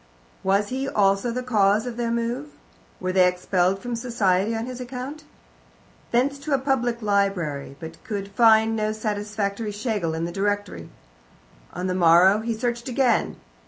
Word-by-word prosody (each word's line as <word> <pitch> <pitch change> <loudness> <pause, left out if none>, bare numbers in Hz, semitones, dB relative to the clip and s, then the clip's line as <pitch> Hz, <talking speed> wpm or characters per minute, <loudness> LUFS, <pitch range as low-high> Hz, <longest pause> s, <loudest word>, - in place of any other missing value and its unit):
Was 200 +2 +1
he 265 +2 -2
also 195 +3 +2
the 250 +2 -3
cause 215 -2 +2
of 245 -2 -5
their 235 -1 -2
move? 235 -8 -2 0.5
Were 185 - -2
they 185 -1 +5
expelled 180 +1 +1
from 240 +4 -5
society 225 -3 0
on 225 +1 -3
his 250 0 -7
account? 255 +4 -7 0.8
Thence 275 +4 +1
to 285 0 0
a - - +2
public 245 -4 -1
library, 190 -10 -1
but 160 -1 -10
could 205 -5 -4
find 220 +1 +5
no 215 0 -1
satisfactory 210 0 -3
Schlegel 205 -6 -2
in 165 +1 -2
the 170 - -4
directory. 200 - -2 0.8
On 180 - -5
the 185 - 0
morrow 180 +3 +5
he 225 +1 -2
searched 235 +1 -2
again. 250 -2 +1
215 Hz, 160 wpm, -24 LUFS, 195-240 Hz, 0.8 s, they